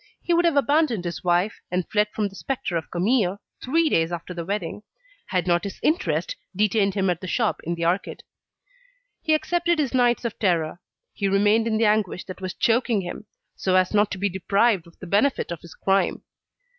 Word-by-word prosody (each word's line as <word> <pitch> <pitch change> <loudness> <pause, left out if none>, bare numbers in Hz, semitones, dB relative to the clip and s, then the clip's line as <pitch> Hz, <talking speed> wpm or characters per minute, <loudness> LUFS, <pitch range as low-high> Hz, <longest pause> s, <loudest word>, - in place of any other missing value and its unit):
He 345 - +1
would 345 +1 +3
have 330 -4 +3
abandoned 280 - +2
his 175 - -4
wife, 180 +4 +1
and 180 0 -1
fled 210 -1 +2
from 210 -2 -1
the 195 - -12
spectre 265 -6 -3
of 165 -2 -3
Camille, 195 +1 +1 0.2
three 325 +5 +2
days 165 - +2
after 175 +1 -5
the 170 -1 -4
wedding, 195 +1 -3 0.5
had 180 -2 0
not 175 -1 +2
his 200 -2 -6
interest 365 +9 0 0.2
detained 205 0 +2
him 195 -1 +1
at 175 - -4
the 185 - -6
shop 225 +4 0
in 170 +2 -1
the 170 0 -2
arcade. 180 +3 -1 1.0
He 315 -2 +3
accepted 345 +2 +1
his 285 -4 0
nights 245 -1 +2
of 230 - -4
terror, 170 -3 0 0.3
he 200 - -1
remained 205 +3 +3
in 220 -1 +1
the 225 - +3
anguish 210 -4 +1
that 185 +1 -9
was 185 0 -4
choking 230 -2 +2
him, 180 +3 -7 0.3
so 185 -1 0
as 185 +1 +3
not 205 0 +3
to - - -4
be 200 +2 0
deprived 195 0 +1
of 170 - -19
the - - -9
benefit 205 +5 +1
of 170 - -5
his 170 - -13
crime. 195 0 +1
200 Hz, 205 wpm, -24 LUFS, 180-235 Hz, 1.0 s, would